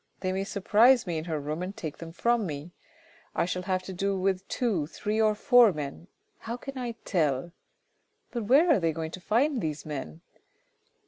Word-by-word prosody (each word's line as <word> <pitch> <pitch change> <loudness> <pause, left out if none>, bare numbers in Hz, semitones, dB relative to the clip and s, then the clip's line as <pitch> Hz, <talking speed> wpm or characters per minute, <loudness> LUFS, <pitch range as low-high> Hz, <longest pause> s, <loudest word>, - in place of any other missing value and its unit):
They 185 -1 0
may 190 +1 -1
surprise 220 +6 +4
me 170 -3 -2
in 155 - -7
her 160 -3 -2
room 150 +3 -4
and 185 +2 -5
take 155 -3 -6
them 165 -1 -8
from 235 +4 +1
me. 150 +2 -6 0.6
I - - +2
shall 180 +1 -2
have 185 0 -1
to 190 - -7
deal 195 +2 -1
with 190 0 0
two, 200 - 0
three, 210 +6 -2
or 215 -1 +3
four 245 -1 +6
men. 150 +1 -6 0.3
How 230 +2 -5
can 275 +2 -8
I 245 -2 -3
tell? 155 -3 0 0.8
But 235 -3 -3
where 295 - +5
are 295 - +5
they 165 -2 +1
going 160 0 -4
to 185 - -8
find 245 +6 +1
these 155 -2 -3
men 155 +2 -6
185 Hz, 195 wpm, -28 LUFS, 160-225 Hz, 0.8 s, four